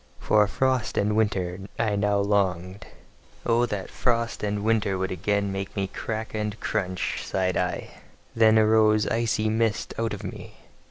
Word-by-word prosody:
For 105 -1 +3
frost 130 +1 0
and 105 +1 +2
winter 95 -4 0 0.2
I 110 -3 +1
now 100 0 +1
longed: 100 -2 0 0.6
"Oh, 120 +1 +3
that 105 -4 -4
frost 115 -2 0
and 105 -1 -2
winter 105 -3 +1
would 95 0 -2
again 100 +2 0
make 95 0 -5
me 100 -1 0
crack 110 +3 -5
and 105 0 -3
crunch!" 95 -4 -2
sighed 95 -1 -1
I: - - -2 0.5
then 110 -1 +5
arose 110 -1 +4
icy 110 -1 0
mist 110 0 0
out 115 -1 -1
of - - -10
me. - - -8
105 Hz, 155 wpm, -25 LUFS, 100-110 Hz, 0.6 s, then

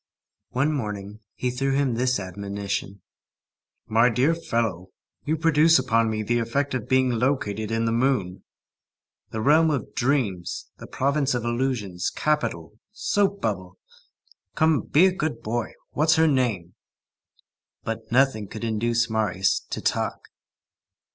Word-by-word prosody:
One 140 +5 +1
morning, 105 -5 -5 0.2
he 125 - -1
threw 135 +2 -1
him 140 -3 +1
this 125 +1 +1
admonition:— 100 0 -5 0.8
"My 115 +3 +4
dear 130 +7 +2
fellow, 115 - -2 0.4
you 155 +2 0
produce 160 0 +5
upon 115 -3 +2
me 110 -1 -2
the 120 +3 +1
effect 140 +5 -1
of 125 -4 -3
being 130 -1 +3
located 110 -4 -1
in 115 0 0
the 115 - +1
moon, 115 -7 0 0.9
the 110 - -4
realm 155 +6 +5
of 140 -7 -2
dreams, 120 -10 -1
the - - -9
province 140 0 0
of 120 -1 -2
illusions, 120 -7 -1
capital, 110 - -2
soap 200 -2 0
bubble. 95 -4 -3 0.8
Come, 160 -1 +3
be 160 +6 +4
a 190 - +4
good 160 -4 -3
boy, 115 +1 -2 0.2
what's 160 +2 +3
her 160 0 +4
name?" 115 - 0 1.1
But 115 +1 -5
nothing 125 -5 +2
could 110 +3 -8
induce 115 +1 +1
Marius 105 -4 +1
"to - - -4
talk." - - -2
120 Hz, 135 wpm, -24 LUFS, 105-140 Hz, 1.1 s, produce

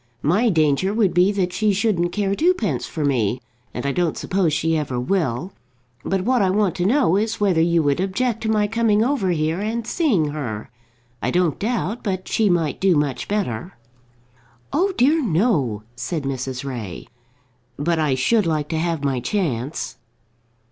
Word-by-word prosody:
My 200 +11 +3
danger 160 +3 +2
would 210 -5 +2
be 180 +3 +4
that 180 -3 -1
she 210 +1 +2
shouldn't 185 -4 +1
care 200 0 0
twopence 215 - +1
for 155 -3 -3
me; 125 -4 +1 0.3
and 125 - -5
I 140 - +1
don't 170 +2 0
suppose 185 -4 0
she 165 +2 +1
ever 140 -5 -2
will. 160 +2 -1 0.5
But 195 -1 0
what 250 +2 +2
I 190 - +3
want 200 -1 +2
to 180 +1 +1
know 235 - +3
is 220 +2 -1
whether 190 -6 +3
you 170 -1 +3
would 145 +2 +1
object 225 +4 -1
to 220 - -2
my 210 -1 +2
coming 220 0 +2
over 250 -7 0
here 160 0 0
and 220 +2 -2
seeing 230 - +1
her. 125 -8 -5 0.5
I - - 0
don't 175 -4 +1
doubt 225 0 -2
but 185 -3 -3
she 220 -2 +2
might 165 -4 0
do 190 -2 +4
much 145 -3 -1
better." 180 - -3 1.0
"Oh 380 +6 +2
dear 295 +6 +4
no," 160 - +1
said 160 +3 -3
Mrs. 130 -1 -4
Ray. 115 -9 -6 0.7
"But 165 +3 0
I 150 -4 +2
should 205 - +2
like 155 -2 -1
to 160 - -1
have 165 -3 -1
my 135 -3 0
chance." 130 - -2
180 Hz, 175 wpm, -22 LUFS, 145-210 Hz, 1.0 s, be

